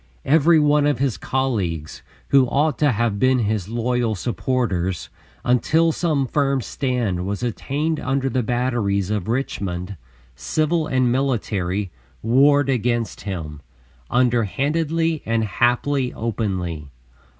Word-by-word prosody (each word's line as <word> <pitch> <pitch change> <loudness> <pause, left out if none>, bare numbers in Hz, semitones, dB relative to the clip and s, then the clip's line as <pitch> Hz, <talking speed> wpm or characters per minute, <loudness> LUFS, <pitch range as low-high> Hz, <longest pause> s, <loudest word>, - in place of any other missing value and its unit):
Every 160 +2 +5
one 150 0 +3
of 145 -3 +1
his 135 -2 0
colleagues, 100 - -2 0.3
who 135 -2 +5
ought 150 +4 +1
to 145 -2 +4
have 115 -2 0
been 130 +2 +3
his 105 -4 -1
loyal 120 -1 0
supporters, 100 -5 -2 0.4
until 155 +7 +3
some 155 -4 0
firm 140 0 +1
stand 120 -7 -2
was 100 +4 -3
attained 145 +6 -2
under 135 0 -1
the 130 0 0
batteries 115 -5 0
of 105 -3 -2
Richmond, 100 -6 -3 0.4
civil 155 - 0
and 130 -4 +2
military, 105 -8 -1 0.3
warred 140 +4 +4
against 120 -3 -1
him, 75 -6 -5 0.5
underhandedly 145 - +1
and 115 0 0
haply 125 +5 +1
openly. 95 -9 -3
125 Hz, 115 wpm, -22 LUFS, 105-140 Hz, 0.5 s, Every